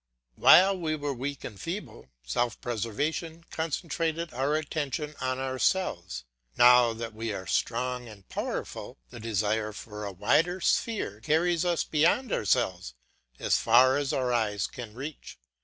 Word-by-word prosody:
While 190 - +6
we 155 -2 -1
were 145 -2 -3
weak 135 +2 -5
and 100 - -8
feeble, 165 - -6 0.2
self 115 - -1
preservation 145 +9 -3
concentrated 165 +1 -2
our 135 +4 0
attention 150 -1 -3
on 130 0 -1
ourselves; 130 - -1 0.3
now 125 -1 +7
that 115 0 -6
we 110 +1 -4
are 95 -1 -5
strong 125 +5 -1
and 100 -4 -13
powerful, - - -5
the - - -9
desire 110 0 -1
for 105 0 -8
a 100 - -4
wider 160 - +2
sphere 185 - 0
carries 165 +6 +2
us 175 -2 +1
beyond 170 - +2
ourselves 90 - 0 0.4
as - - +2
far 125 +3 +5
as 140 -1 0
our 125 -2 0
eyes 105 -4 0
can 115 -4 -8
reach. 140 +4 -8
130 Hz, 140 wpm, -28 LUFS, 110-160 Hz, 0.4 s, now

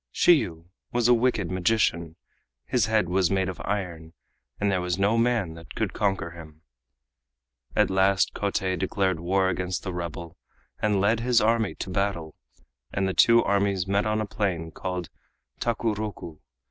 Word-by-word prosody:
Shiyu 95 - +3 0.3
was 120 -1 +2
a 125 - +6
wicked 115 -7 +1
magician, 90 -4 +1 0.5
his 120 - +1
head 110 -4 +2
was 90 0 +2
made 95 -1 +1
of 95 - -6
iron, 85 -5 -4 0.5
and 100 -1 +1
there 95 -2 0
was 90 0 -1
no 100 +3 +2
man 115 -7 +1
that 80 0 -12
could - - -2
conquer 95 -4 -1
him. 80 -2 -13 1.1
At 105 -3 +3
last 95 0 +2
Kotei 95 -2 -1
declared 95 -3 0
war 95 +3 +1
against 95 -1 -2
the 95 - -4
rebel 85 0 -6 0.4
and 105 -2 +2
led 110 +4 +2
his 120 0 +3
army 110 -1 +1
to 95 - -6
battle, 90 -5 -2 0.6
and 95 0 0
the 95 - -1
two 115 +3 +5
armies 100 -2 +1
met 100 +2 +1
on 110 0 0
a - - -1
plain 95 -7 -2
called 90 -1 -5 0.5
Takuroku. 110 -8 -3
95 Hz, 160 wpm, -26 LUFS, 90-105 Hz, 1.1 s, a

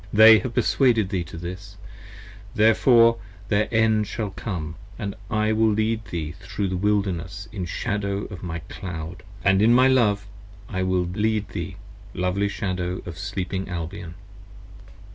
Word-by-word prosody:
35 - - -1
They 110 0 +10
have 125 +1 -5
perswaded 115 -7 +3
thee 95 -4 -1
to 80 - -9
this, 95 +3 -8 0.8
therefore 115 +2 +5 0.3
their 105 +1 +2
end 110 -2 +3
shall 110 -4 -3
come, 85 -7 -5 0.2
And 100 -1 -4 0.2
I 110 0 +1
will 110 0 +3
lead 110 +1 0
thee 80 -3 -4
thro' 95 +2 -4
the 95 -1 -1
Wilderness 95 -2 -1
in 95 -5 -4
shadow 100 +3 -2
of 90 - -8
my 85 -2 -5
cloud, 90 -2 -7 0.2
And 95 0 +4
in 115 +3 +6
my 130 +1 +6
love 105 -6 +3 0.4
I 95 -3 -3
will 95 -1 +1
lead 110 0 0
thee, - - -5 0.4
lovely 90 +3 0
Shadow 90 -3 -3
of 85 -1 -7
Sleeping 95 -1 -3
Albion. 85 0 -5
100 Hz, 150 wpm, -24 LUFS, 90-110 Hz, 0.8 s, They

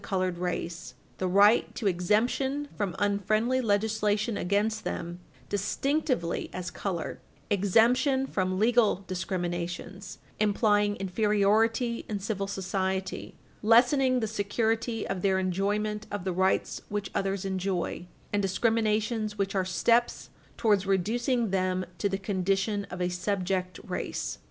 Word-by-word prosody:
308 - - -10
colored 185 -2 0
race 175 -1 -4 0.2
the 185 - 0
right 205 +5 +4
to 225 - -5
exemption 225 +10 +1
from 195 -5 -2
unfriendly 215 +5 +1
legislation 215 0 +1
against 210 +4 0
them 170 +1 -4 0.3
distinctively 250 - -1
as 180 0 -5
colored 180 -5 -4 0.3
exemption 235 +7 +3
from 185 -6 -1
legal 220 -2 +3
discriminations, 180 +1 -4 0.2
implying 205 -1 +2
inferiority 215 +4 +1
in 210 -2 -2
civil 195 0 -2
society, 190 -1 -3 0.3
lessening 250 +3 +4
the 220 - 0
security 225 +2 -1
of 195 -2 -3
their 190 0 +2
enjoyment 205 +3 -1
of 205 -3 -4
the 185 -1 -1
rights 190 +2 +1
which 205 -1 -3
others 195 0 -1
enjoy, 185 -2 -2 0.3
and 205 - +2
discriminations 215 +1 0
which 195 0 -1
are 190 -2 +1
steps 235 +5 +1 0.3
towards 205 -4 +2
reducing 230 +4 +1
them 185 -1 0
to 200 - +1
the 195 - -1
condition 195 +1 -1
of 180 - -7
a 180 - +1
subject 185 0 -2
race. - - -4
205 Hz, 125 wpm, -28 LUFS, 185-220 Hz, 0.3 s, right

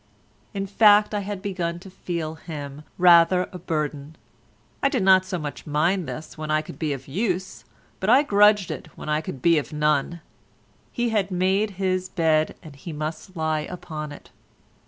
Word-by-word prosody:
In 195 0 -2
fact 210 +1 +5
I 210 - 0
had 200 -1 -5
begun 175 -4 -2
to 190 - -11
feel 170 -4 -4
him 150 -3 -8 0.2
rather 175 0 +6
a 180 - -8
burden; 150 -3 -3 0.7
I 275 - +3
did 255 -7 0
not 190 -1 +6
so 185 -1 -3
much 150 -2 -7
mind 160 +5 +1
this 155 0 -8
when 155 0 -5
I 155 0 +1
could - - -11
be 155 -3 -1
of 135 -2 -5
use, 185 +3 -3 0.3
but 190 - -1
I 260 +5 +6
grudged 210 - +4
it - - -6
when - - -7
I 150 0 +1
could 135 -5 -8
be 170 -2 +5
of 150 - -7
none. 150 +2 0 0.7
He 240 0 -1
had 205 -3 0
made 190 +2 0
his 185 -1 -1
bed 160 -3 +1
and 150 -3 -11
he 150 +5 -8
must 155 +4 -6
lie 160 -1 0
upon 160 -4 -6
it. 145 - -13
175 Hz, 180 wpm, -24 LUFS, 155-195 Hz, 0.7 s, rather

